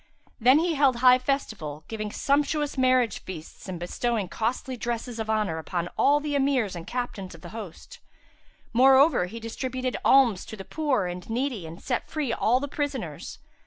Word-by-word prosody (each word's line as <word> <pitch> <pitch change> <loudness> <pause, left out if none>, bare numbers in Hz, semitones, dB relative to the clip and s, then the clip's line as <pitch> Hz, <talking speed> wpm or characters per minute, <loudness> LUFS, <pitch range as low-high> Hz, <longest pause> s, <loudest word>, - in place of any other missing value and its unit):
Then 255 +4 +6
he 335 +1 +1
held 280 -4 +3
high 250 +1 +6
festival, 220 - -3
giving 215 -2 -4
sumptuous 290 +3 0
marriage 255 -3 +2
feasts 175 +1 -9
and 180 -2 -5
bestowing 205 +3 -2
costly 235 +8 -2
dresses 235 0 -4
of 220 0 -3
honour 210 -7 0
upon 175 +1 -3
all 290 +1 +4
the 295 0 -3
Emirs 270 -8 +1
and 170 +1 -8
Captains 220 -7 -4
of 165 - -15
the 175 - -9
host; 225 - -9 0.7
moreover 265 - +5
he 225 +5 -8
distributed 255 +2 -3
alms 245 -8 +5
to 220 - -8
the 195 - -8
poor 285 -10 0
and 180 +2 -6
needy 235 -6 -2
and 165 +2 -11
set 250 -2 -2
free 295 -7 -2
all 245 +3 +2
the 285 - -3
prisoners. 290 0 -4
240 Hz, 170 wpm, -26 LUFS, 195-270 Hz, 0.7 s, Then